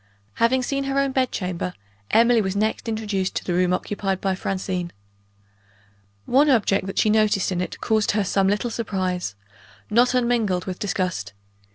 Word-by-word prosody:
Having 255 +2 +3
seen 275 +2 -2
her 275 0 -1
own 275 -1 +2
bed 260 -1 +1
chamber, 180 -1 -3 0.3
Emily 230 0 +5
was 190 -1 -2
next 215 +2 -1
introduced 210 -4 -2
to - - -2
the 180 - -2
room 180 0 +2
occupied 195 +1 -1
by 195 -1 0
Francine. 185 -2 -3 1.3
One 285 +4 +4
object 205 -6 +2
that 195 - -6
she 215 - +3
noticed 215 -3 +2
in 180 -1 -1
it 180 - -5
caused 220 -2 +1
her 210 -1 +1
some 195 0 +1
little 210 +4 0
surprise 185 - -2 0.6
not 245 +3 +4
unmingled 235 -7 +1
with 185 -1 -5
disgust. 180 - -2
205 Hz, 165 wpm, -23 LUFS, 185-230 Hz, 1.3 s, Emily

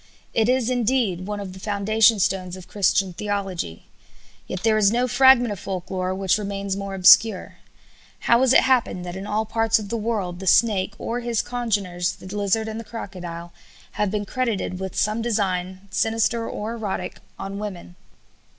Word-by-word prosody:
It 225 +1 +2
is, 255 -1 +2
indeed, 230 -7 0
one 210 0 -3
of 195 -2 -6
the 190 - -11
foundation 215 +3 +3
stones 185 -1 -1
of 185 - -12
Christian 195 -2 +1
theology. 195 - -4 0.6
Yet 185 - -5
there 220 -1 +3
is 210 -2 +4
no 245 +2 +1
fragment 255 -1 +5
of 200 - -5
folk 185 -2 -5
lore 185 0 -1
which 195 +1 +1
remains 200 -1 -3
more 200 0 -5
obscure. 195 +2 +5 0.6
How 235 +1 +4
has 260 -2 +4
it - - +7
happened 240 -8 +1
that 175 0 -6
in 195 +2 -6
all 215 +1 0
parts 225 0 +2
of 210 -2 -6
the 230 - -1
world 210 -6 -2
the 190 - -7
snake 205 -1 +3
or 235 +3 -3
his 235 -2 -1
congeners, 200 -8 -1
the - - -14
lizard 205 +2 0
and 220 0 -5
the - - -6
crocodile, 175 -6 -8 0.4
have 210 -1 -1
been 205 +1 -2
credited 225 -6 -2
with 190 -1 -5
some 215 +2 0
design, 190 -5 -1
sinister 225 +2 0
or 215 +2 -4
erotic, 215 -4 -4 0.2
on 195 +1 -6
women? 185 -4 -7
205 Hz, 180 wpm, -23 LUFS, 190-225 Hz, 0.6 s, it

